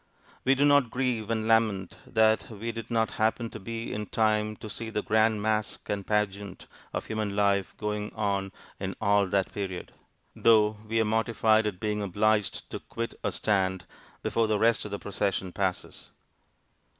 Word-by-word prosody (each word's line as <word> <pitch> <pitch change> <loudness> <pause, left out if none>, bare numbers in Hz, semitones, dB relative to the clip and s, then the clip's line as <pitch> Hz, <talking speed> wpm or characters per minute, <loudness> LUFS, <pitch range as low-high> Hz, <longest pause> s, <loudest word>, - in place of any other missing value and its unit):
We 135 - +4
do 140 +2 +3
not 145 -4 +5
grieve 125 -4 -1
and 110 -1 0
lament 110 -5 +2
that 110 0 +3
we 115 +1 -4
did 115 -1 -7
not 115 -2 +1
happen 110 +1 +1
to - - -7
be 115 +3 -5
in 105 0 -4
time 110 -1 +1
to 110 - -9
see 110 +2 -6
the 105 -1 -2
grand 110 -1 +2
mask 110 -1 -1
and 100 -1 -2
pageant 100 -2 -1 0.3
of - - -3
human 110 -2 -2
life 100 -2 +1
going 105 0 -3
on 100 -2 -1 0.3
in 95 -1 -3
all 100 -1 +3
that 95 0 0
period; 95 -3 -4 0.4
though 110 -2 +4
we 115 +1 +1
are 110 - +3
mortified 110 0 +2
at 95 -4 -4
being 105 0 -1
obliged 105 +2 +1
to - - -4
quit 115 0 -5
our - - +1
stand 95 -4 0 0.4
before 115 -1 +1
the 110 -1 +2
rest 115 +1 +3
of - - -5
the 100 - -3
procession 100 -2 -2
passes. 95 -2 -3
105 Hz, 175 wpm, -28 LUFS, 100-110 Hz, 0.4 s, not